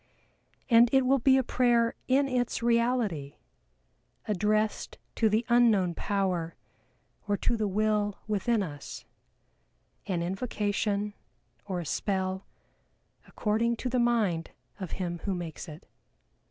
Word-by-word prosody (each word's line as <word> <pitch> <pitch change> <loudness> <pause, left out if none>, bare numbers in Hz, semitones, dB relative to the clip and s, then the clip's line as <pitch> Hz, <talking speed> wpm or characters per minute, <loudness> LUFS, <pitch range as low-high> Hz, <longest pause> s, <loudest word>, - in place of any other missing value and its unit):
And 235 -1 +6
it 265 -1 +4
will 270 +1 +3
be 265 +2 +5
a 265 - +2
prayer 235 -2 +2
in 275 +2 +3
its 245 -2 -1
reality, 235 - +1 0.9
addressed 215 +1 0 0.2
to 220 - +2
the 220 +3 +1
Unknown 225 -7 +4
Power 180 -4 -1 0.7
or 205 0 +1
to 235 - 0
the 215 -2 -1
Will 210 0 0
within 215 +1 +1
us 145 -5 -8 1.0
an 175 -3 -1
invocation, 205 +1 -1 0.5
or 185 -3 -2
a 170 - -5
spell, 190 +3 -2 0.8
according 225 +2 0
to 250 - -3
the 250 0 0
mind 215 -9 +1 0.3
of 185 -4 -6
him 175 -2 -3
who 195 -2 0
makes 175 -1 -6
it. 155 0 -11
210 Hz, 125 wpm, -29 LUFS, 185-235 Hz, 1.0 s, And